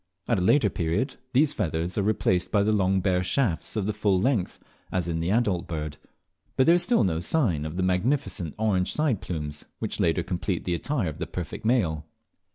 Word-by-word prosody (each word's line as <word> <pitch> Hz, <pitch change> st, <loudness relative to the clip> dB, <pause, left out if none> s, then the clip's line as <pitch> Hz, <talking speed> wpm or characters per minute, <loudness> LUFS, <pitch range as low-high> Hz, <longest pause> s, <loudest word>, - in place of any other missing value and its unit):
At -, -, +2 dB
a -, -, -1 dB
later 105 Hz, +2 st, +4 dB
period 85 Hz, -, -1 dB
these 140 Hz, +3 st, +3 dB
feathers 85 Hz, +2 st, -2 dB
are 105 Hz, -, +1 dB
replaced 95 Hz, -3 st, +1 dB
by 100 Hz, -2 st, +3 dB
the 110 Hz, -, +2 dB
long 95 Hz, -2 st, +2 dB
bare 90 Hz, -1 st, +1 dB
shafts 90 Hz, -2 st, 0 dB
of 105 Hz, -3 st, 0 dB
the 105 Hz, -, -1 dB
full 100 Hz, -3 st, +1 dB
length, 110 Hz, -3 st, 0 dB, 0.3 s
as 90 Hz, -2 st, -1 dB
in 80 Hz, -1 st, -1 dB
the 85 Hz, +2 st, -1 dB
adult 100 Hz, -5 st, +1 dB
bird; 75 Hz, -3 st, -4 dB, 0.6 s
but 130 Hz, -, +4 dB
there 165 Hz, -, +6 dB
is 175 Hz, -, +4 dB
still 235 Hz, -, +3 dB
no 85 Hz, -5 st, 0 dB
sign 85 Hz, -, +1 dB
of 80 Hz, +3 st, -5 dB
the 95 Hz, -, 0 dB
magnificent 95 Hz, -, 0 dB
orange 100 Hz, -4 st, +1 dB
side 150 Hz, -9 st, 0 dB
plumes, 75 Hz, -4 st, -5 dB
which -, -, -4 dB
later 80 Hz, -1 st, +2 dB
still -, -, -10 dB
complete 90 Hz, 0 st, -2 dB
the 90 Hz, -, -1 dB
attire 110 Hz, -, -1 dB
of 80 Hz, +1 st, -9 dB
the 85 Hz, -, -3 dB
perfect 90 Hz, +5 st, -6 dB
male. 90 Hz, -11 st, +1 dB
95 Hz, 210 wpm, -26 LUFS, 85-110 Hz, 0.6 s, there